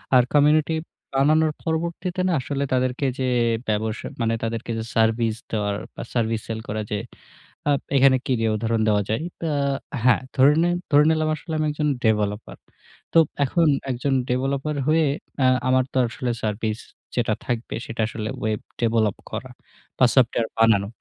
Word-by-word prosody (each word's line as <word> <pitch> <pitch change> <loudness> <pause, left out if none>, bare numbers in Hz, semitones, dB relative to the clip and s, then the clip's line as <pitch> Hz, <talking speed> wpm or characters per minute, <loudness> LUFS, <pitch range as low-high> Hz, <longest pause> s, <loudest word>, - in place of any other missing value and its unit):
আর 125 - +7
community 150 +2 +4 0.4
বানানোর 155 +3 +3
পরবর্তীতে 170 +3 -2
না - - +1
আসলে 140 +1 -2
তাদেরকে 130 +2 0
যে 130 - 0 0.4
ব্যবস 110 +1 -1 0.2
মানে 115 0 +1
তাদেরকে 115 +1 -3
যে 110 - -3
সার্ভিস 115 0 +2 0.2
দেওয়ার 105 -2 -1 0.2
বা - - -6
সার্ভিস 115 -2 0
সেল 110 -1 -3
করা। 110 +1 -2
যে 105 - 0 0.7
আ - - +5 0.3
এখানে 135 0 +6
কী 130 - +1
দিয়ে 115 -1 +1
উদাহরণ 115 0 0
দেওয়া 105 -1 +2
যায়? 110 +8 -1 0.2
অ্যা 160 - 0 0.5
হ্যাঁ, 125 0 +4
ধরে 140 +2 +6
নিন 175 0 +2 0.2
ধরে 145 +1 +6
নিলাম 155 -1 +1
আসলে 160 +1 -7
আমি 155 - +1
একজন 150 0 -1 0.2
ডেভেলপার। 105 -1 0 0.6
তো - - +4 0.3
এখন 165 +4 +2 0.2
একজন 130 +3 -1 0.2
ডেভেলপার 135 +4 -1
হয়ে 160 0 +4 0.4
আ - - +5 0.2
আমার 130 0 +4
তো - - -1
আসলে 120 +2 -3
সার্ভিস 110 +1 -2 0.4
যেটা 115 -3 +1
থাকবে 120 -1 -3
সেটা 115 0 -4
আসলে 110 -1 -5
ওয়েব 110 -1 -1 0.2
ডেভেলপ 110 -3 +2 0.2
করা - - -5 0.5
বা 130 - +7
সফটওয়্যার 120 -3 +3
বানানো। 105 -3 +4
125 Hz, 160 wpm, -23 LUFS, 110-145 Hz, 0.7 s, আর